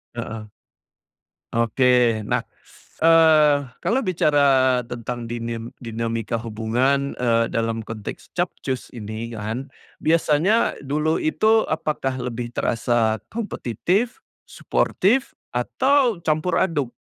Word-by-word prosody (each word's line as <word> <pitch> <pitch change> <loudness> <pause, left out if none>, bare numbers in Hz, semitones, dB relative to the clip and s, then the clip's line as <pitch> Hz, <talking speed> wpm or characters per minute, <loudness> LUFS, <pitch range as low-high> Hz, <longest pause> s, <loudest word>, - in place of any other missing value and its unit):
Heeh. 115 -2 -5 1.1
Oke. 115 -1 +3
Nah, - - 0 0.6
eee, 160 -3 +6 0.3
kalau 255 +4 +2
bicara 140 - +3
tentang 120 0 -5
dinim 115 0 -4 0.2
dinamika 115 0 -2
hubungan, 120 +5 0
eee, 115 -1 +2
dalam 115 -1 -1
konteks 110 -3 -8
Capcus 175 -7 -3
ini, 110 +2 -6
kan, 110 +6 -4 0.3
biasanya 165 +6 +2
dulu 150 +3 0
itu 220 +8 +2
apakah 150 -4 -2
lebih 120 -1 -4
terasa 115 -2 +1
kompetitif, 210 - -2 0.2
suportif, 250 +8 0 0.2
atau 250 - +2
campur 155 +3 +1
aduk? 150 -9 +1
125 Hz, 95 wpm, -22 LUFS, 115-160 Hz, 1.1 s, eee